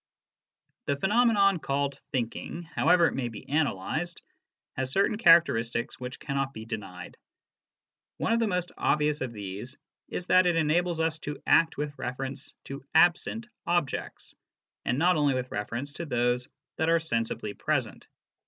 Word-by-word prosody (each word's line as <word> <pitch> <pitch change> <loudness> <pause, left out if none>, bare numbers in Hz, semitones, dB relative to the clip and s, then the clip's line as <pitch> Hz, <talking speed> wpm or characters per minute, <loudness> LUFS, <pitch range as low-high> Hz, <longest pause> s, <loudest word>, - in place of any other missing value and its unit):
The 140 - +2
phenomenon 200 +1 +3
called 140 -1 -1
"thinking," 130 +7 -3
however 170 +1 +3
it - - +1
may 130 -3 -2
be 110 -3 -9
analysed, 155 - -1 0.5
has 130 0 -2
certain 200 +6 +2
characteristics 120 - +4
which 125 0 -6
cannot 135 -1 -2
be 110 0 -7
denied. 95 -6 -7 1.0
One 230 - +1
of 230 - +2
the 230 - +2
most 180 -3 -1
obvious 150 0 +1
of 130 -2 -2
these 105 +5 -7 0.3
is 180 - -5
that 185 0 +5
it 175 - +2
enables 165 +2 +1
us 160 -1 0
to 145 0 -6
act 165 -1 +4
with 145 0 -3
reference 135 +2 -4
to 135 0 -8
absent 220 +6 +3 0.2
objects, 170 -5 -2 0.5
and 125 - +1
not 175 +3 +3
only 145 -3 +2
with 130 0 -3
reference 120 +7 -4
to 170 +2 -6
those 120 -1 +1 0.3
that 160 - +1
are 165 0 +4
sensibly 115 -8 -2
present. - - -2
145 Hz, 150 wpm, -28 LUFS, 125-170 Hz, 1.0 s, that